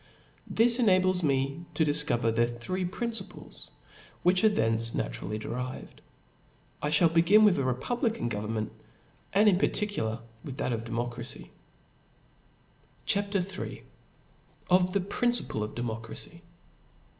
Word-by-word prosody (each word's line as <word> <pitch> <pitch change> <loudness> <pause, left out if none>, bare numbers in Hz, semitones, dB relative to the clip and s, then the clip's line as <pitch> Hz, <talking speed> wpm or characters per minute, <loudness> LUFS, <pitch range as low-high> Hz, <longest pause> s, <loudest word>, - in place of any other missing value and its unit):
This 235 +2 +4
enables 185 -4 +4
me 140 +2 0
to 160 - +3
difcover 145 -6 +2
their 120 +1 +3
three 120 +11 -3
principles; 230 +5 -4 0.5
which 180 +2 +3
are 220 - +7
naturally 110 - 0
derived 125 +4 -6 0.8
from 150 - 0
thence. 150 - +4
I - - +7
ihall 165 - +3
begin 175 +6 +6
with 190 -8 +4
a - - +1
republican 215 - -1
government, 110 0 -3 0.6
and 205 +3 +4
in 190 -3 +5
particular 120 - 0 0.2
with 135 -3 -7
that 125 - -1
of 115 0 -3
de« 115 - -8
irtocracy. 120 - -4 1.6
CHAP. 200 0 0
III. 190 0 -3 0.9
Of 180 0 +5
the 200 +1 +1
Principle 230 - 0
of 105 - -6
Democracy. 115 -1 -6
150 Hz, 125 wpm, -29 LUFS, 115-195 Hz, 1.6 s, are